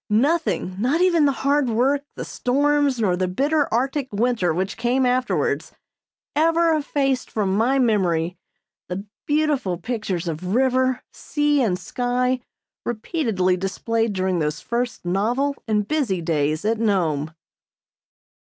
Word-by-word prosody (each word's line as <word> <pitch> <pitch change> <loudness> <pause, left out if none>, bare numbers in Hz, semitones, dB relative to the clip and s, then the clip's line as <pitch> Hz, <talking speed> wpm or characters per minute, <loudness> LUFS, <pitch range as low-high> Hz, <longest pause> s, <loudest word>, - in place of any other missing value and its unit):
Nothing, 245 - +1
not 260 +9 +1
even 340 -4 +4
the 280 - +4
hard 285 -2 +3
work, 260 +5 +2
the - - -5
storms, 285 0 +1
nor 195 -5 +2
the 185 0 0
bitter 285 - +1
Arctic 265 +3 -1
winter 220 -4 +1
which 185 +4 -2
came 245 +3 +1
afterwards 250 +1 0 0.6
ever 330 +2 +3
effaced 275 -3 0
from 195 -3 0
my 240 +6 +2
memory 180 -8 +1 0.5
the 190 +3 -4 0.2
beautiful 295 - +1
pictures 190 -3 -3
of 180 +5 -3
river, 260 0 +2
sea 295 -1 +1
and 195 -7 +1
sky 250 +5 -1 0.4
repeatedly 220 - 0
displayed 220 +4 -1
during 185 -2 0
those 150 0 -1
first 240 -3 -3
novel 240 +10 0
and 210 -2 +1
busy 265 - 0
days 155 0 0
at 225 +1 +1
Nome. 160 -8 0
235 Hz, 130 wpm, -22 LUFS, 185-275 Hz, 0.6 s, even